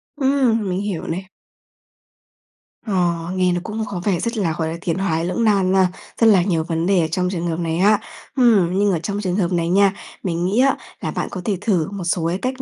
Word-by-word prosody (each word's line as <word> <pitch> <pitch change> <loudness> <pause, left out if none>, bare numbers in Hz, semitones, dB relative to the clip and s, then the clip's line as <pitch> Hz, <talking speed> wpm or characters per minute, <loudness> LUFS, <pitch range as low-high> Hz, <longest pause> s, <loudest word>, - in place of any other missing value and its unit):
Ừm, 265 -7 +1
mình 185 +1 -1
hiểu 200 -5 -4
này. 185 +3 -5 1.6
Ờ, 175 -4 0
nghe 185 -1 +2
nó 175 - 0
cũng 220 +3 -4
có 190 -4 -5
vẻ 190 -5 +1
rất 235 0 -2
là, 170 -6 0
gọi 160 - -1
là, 165 - -5
tiến 170 -2 0
thoái 170 -4 0
lưỡng 180 +6 -1
nan 200 -4 +3
nha, 190 -1 +4 0.3
rất 225 - +7
là 195 -5 +6
nhiều 170 -4 0
vấn 165 0 -2
đề 190 -1 +3
ở 160 - 0
trong 180 +2 0
trường 175 -2 -3
hợp 165 0 -2
này 165 -1 -1
ha. 205 +3 +4 0.4
Ừm, 200 -8 +4
nhưng 205 0 +3
ở 175 - 0
trong 200 +5 -3
trường 185 -3 -1
hợp 190 -3 0
này 170 -1 0
nha, 195 +1 +4 0.3
mình 175 -2 -1
nghĩ 200 +6 +1
á, 270 +1 +4 0.2
là - - -2
bạn - - -3
có 185 - -5
thể 200 -3 0
thử 185 -8 +1
một 200 -2 -5
số 170 -1 0
cái 175 +2 -1
cách 260 +1 -2
185 Hz, 240 wpm, -20 LUFS, 170-205 Hz, 1.6 s, rất